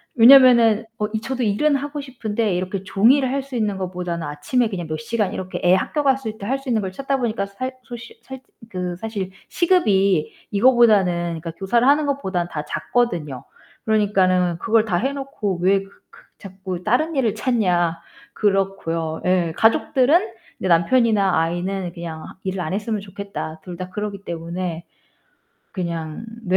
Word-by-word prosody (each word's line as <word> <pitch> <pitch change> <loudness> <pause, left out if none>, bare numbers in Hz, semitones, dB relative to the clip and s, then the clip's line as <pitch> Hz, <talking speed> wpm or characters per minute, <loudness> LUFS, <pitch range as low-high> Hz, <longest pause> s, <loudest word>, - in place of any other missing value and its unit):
왜냐면은 235 -3 +7
어 210 - -1
이 220 - -1
저도 255 +1 -3
일은 255 +8 +2
하고 290 +1 -4
싶은데 225 -6 -2
이렇게 185 +1 -3
종일 235 +9 +3
할 270 +2 -2
수 270 -2 -9
있는 210 -4 -1
것보다는 180 -3 -4
아침에 150 +12 -1
그냥 175 -6 -5
몇 155 0 -3
시간 205 +4 -1
이렇게 185 0 -5
애 180 - +5
학교 295 +10 -1
갔을 265 -6 0
때 200 - -8
할 270 - 0
수 270 -1 -8
있는 225 -3 +1
걸 190 -2 -4
찾다 275 +6 -2
보니까 225 -5 -1
살 255 +7 -5
소식 235 -1 -11
살 265 +1 -9 0.3
그 180 -3 -4
사실 200 -2 -5 0.2
시급이 200 - +2 0.2
이거보다는 200 -8 +3
그니까 165 - -5
교사를 200 +8 +1
하는 290 +2 +4
것보다는 190 -11 -1
다 150 -2 -4
작거든요. 165 - -2 0.4
그러니까는 185 -5 +2
"그걸 225 +4 +2
다 185 -5 0
해 265 +9 -1
놓고 265 - -4
왜 195 +2 +3
그 195 - -16 0.3
그 - - -17 0.2
자꾸 190 -2 -7
다른 280 - +1
일을 235 -6 +1
찾냐." 180 -9 +1 0.3
그렇고요. 190 -6 -1
예 180 -3 +1
가족들은 290 - +3 0.3
네 - - -2
남편이나 200 +3 +3
아이는 175 +2 -2
"그냥 165 -3 -7 0.2
일을 190 -1 -3
안 155 +1 -3
했으면 210 +1 -2
좋겠다." 195 -5 -7
둘 180 - -7
다 180 +1 -6
그러기 200 0 -5
때문에. 170 0 -5 0.9
그냥 170 -1 -4 0.2
네. 185 -3 +1
200 Hz, 335 characters per minute, -21 LUFS, 180-240 Hz, 0.9 s, 왜냐면은